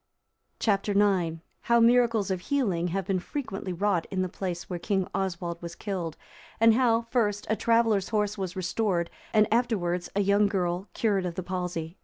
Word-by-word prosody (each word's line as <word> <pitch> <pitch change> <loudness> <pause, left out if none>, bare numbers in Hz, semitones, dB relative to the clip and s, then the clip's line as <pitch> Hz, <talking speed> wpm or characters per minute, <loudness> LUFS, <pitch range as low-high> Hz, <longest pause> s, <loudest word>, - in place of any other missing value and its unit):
Chap. 200 -2 +1
IX. 190 -5 +2 0.2
How 235 0 +4
miracles 230 -3 +4
of 185 - -1
healing 195 -10 0
have 190 +2 -2
been 190 -1 0
frequently 195 -3 -5
wrought 180 -1 0
in 185 -1 -1
the - - -1
place 175 -1 -4
where 175 -2 -4
King 190 0 0
Oswald 175 -3 -3
was 170 0 -7
killed; 180 -6 -4 0.4
and 225 0 +6
how, 230 -1 +3
first, 210 -5 +1
a - - +3
traveller's 225 -3 +2
horse 210 -1 0
was 190 -3 -4
restored 185 -1 -1 0.2
and 215 -1 +4
afterwards 185 -8 0
a 200 - +3
young 200 +1 +3
girl 180 -1 -1
cured 200 -5 +1
of 170 - -5
the 185 - -4
palsy. 180 -1 -4
195 Hz, 175 wpm, -27 LUFS, 180-215 Hz, 0.4 s, and